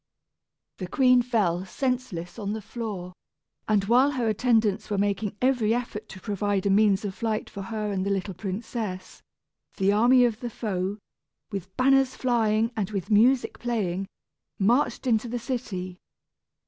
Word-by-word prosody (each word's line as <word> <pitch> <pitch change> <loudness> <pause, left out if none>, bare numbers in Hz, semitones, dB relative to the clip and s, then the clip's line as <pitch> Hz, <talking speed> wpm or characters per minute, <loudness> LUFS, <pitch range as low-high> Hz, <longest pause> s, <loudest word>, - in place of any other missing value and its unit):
The 185 - -4
queen 250 +4 +4
fell 205 -8 0
senseless 215 -6 -3
on 205 -1 -2
the 220 - -4
floor; 200 -6 -6 0.5
and 210 -2 +3
while 250 +6 +5
her 245 -4 -1
attendants 220 -2 +1
were 205 - -1
making 200 +1 -1
every 240 -4 +3
effort 235 -3 -5
to 190 - -10
provide 205 -1 -1
a 200 - +3
means 205 0 +3
of 195 - -3
flight 220 +1 -3
for 200 - -6
her 210 +1 -3
and 190 -2 -1
the 200 - -1
little 195 0 -1
princess, 190 0 -5 0.6
the 195 +1 +3
army 245 +4 +5
of 230 -2 -1
the 240 - -4
foe, 200 -3 -3 0.5
with 190 -2 -6
banners 265 0 +3
flying 225 -2 +1
and 205 -4 -1
with 200 0 -4
music 240 +5 +3
playing, 195 -6 -2 0.5
marched 240 +8 +2
into 235 -2 +2
the 240 +1 -3
city. 200 -8 -4
215 Hz, 155 wpm, -26 LUFS, 195-240 Hz, 0.6 s, while